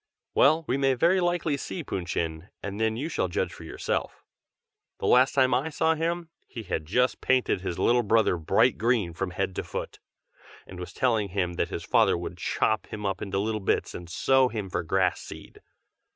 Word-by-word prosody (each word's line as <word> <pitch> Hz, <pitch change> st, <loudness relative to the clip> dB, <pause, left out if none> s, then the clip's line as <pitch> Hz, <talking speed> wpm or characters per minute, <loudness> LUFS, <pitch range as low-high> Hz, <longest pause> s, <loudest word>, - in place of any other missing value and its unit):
well, 155 Hz, +3 st, +4 dB
we 130 Hz, -, +1 dB
may 135 Hz, -1 st, +2 dB
very 170 Hz, +8 st, +3 dB
likely 175 Hz, -4 st, +1 dB
see 165 Hz, +5 st, -5 dB
Pun 90 Hz, -10 st, -4 dB
Chin, 80 Hz, +1 st, -3 dB
and 100 Hz, +2 st, -4 dB
then 110 Hz, 0 st, +1 dB
you 140 Hz, +6 st, -2 dB
shall 165 Hz, -, -1 dB
judge 85 Hz, -, -2 dB
for -, -, -11 dB
yourself. -, -, -3 dB, 0.7 s
The -, -, -5 dB
last 130 Hz, +3 st, +4 dB
time 130 Hz, -2 st, +4 dB
I 130 Hz, +6 st, +1 dB
saw 160 Hz, +1 st, +2 dB
him, 165 Hz, +1 st, -2 dB, 0.2 s
he 115 Hz, -, -7 dB
had 80 Hz, -5 st, -3 dB
just 125 Hz, +8 st, +1 dB
painted 130 Hz, -7 st, +2 dB
his 90 Hz, -3 st, -4 dB
little 120 Hz, +1 st, +3 dB
brother 110 Hz, -3 st, +3 dB
bright 80 Hz, -, +2 dB
green 110 Hz, -7 st, +1 dB
from 95 Hz, +2 st, -3 dB
head 95 Hz, +1 st, -3 dB
to -, -, -1 dB
foot, -, -, -6 dB, 0.7 s
and 90 Hz, -, -10 dB
was 90 Hz, -, -7 dB
telling 110 Hz, -5 st, +1 dB
him 90 Hz, -2 st, -1 dB
that 85 Hz, 0 st, -1 dB
his -, -, -5 dB
father -, -, +3 dB
would -, -, -6 dB
chop 110 Hz, -1 st, 0 dB
him 105 Hz, -1 st, -6 dB
up 95 Hz, -1 st, -2 dB
into 100 Hz, -1 st, -3 dB
little 110 Hz, +2 st, -1 dB
bits -, -, 0 dB
and 85 Hz, -1 st, -8 dB
sow 135 Hz, +8 st, +3 dB
him 105 Hz, -6 st, -5 dB
for 90 Hz, -, -1 dB
grass 90 Hz, +1 st, +1 dB
seed. -, -, -11 dB
110 Hz, 200 wpm, -27 LUFS, 95-135 Hz, 0.7 s, well